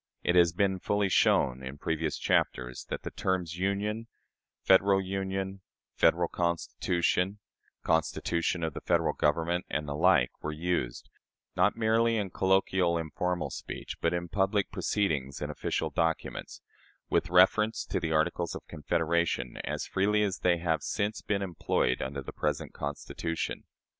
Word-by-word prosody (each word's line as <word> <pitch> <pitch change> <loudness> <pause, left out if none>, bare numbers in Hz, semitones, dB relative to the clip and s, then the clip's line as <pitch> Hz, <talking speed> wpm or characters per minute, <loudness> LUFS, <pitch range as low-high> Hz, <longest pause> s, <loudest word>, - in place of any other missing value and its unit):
It 90 - +2
has 85 -1 +5
been 95 +1 +1
fully 100 +1 +1
shown, 65 -7 +3
in 65 +2 -7
previous 80 0 -2
chapters, 60 -1 0
that - - -4
the - - -5
terms 90 -3 -2
"Union," 105 +4 -1 0.6
"Federal 95 +1 +5
Union," 95 0 -3 0.3
"Federal 85 +1 +3
Constitution," 85 +2 0 0.5
"Constitution 85 +2 0
of 80 -2 -1
the - - -6
Federal - - +1
Government," 85 +4 +1
and 75 +1 -2
the 70 - -3
like, 80 -4 +4
were 75 - -3
used 75 -6 -2 0.4
not 95 +4 +3
merely 115 +1 +3
in 100 -3 -2
colloquial, 95 -2 +2
informal 85 +2 -2
speech, - - -6
but 85 - +2
in 85 0 -2
public 95 +2 0
proceedings 70 -10 -1
and - - -3
official - - -2
documents 80 -1 -2 0.5
with 85 - +2
reference 95 +5 +4
to - - -1
the 80 - -2
Articles 85 +2 0
of - - -8
Confederation, 80 -4 0
as - - -3
freely 105 +2 +2
as 95 -3 -1
they 90 -1 +3
have 80 -2 0
since 105 +5 -2
been 100 -1 -1
employed 85 -8 0
under 70 +1 -4
the - - -8
present - - -2
Constitution. 75 +3 -4
90 Hz, 145 wpm, -29 LUFS, 80-95 Hz, 0.6 s, has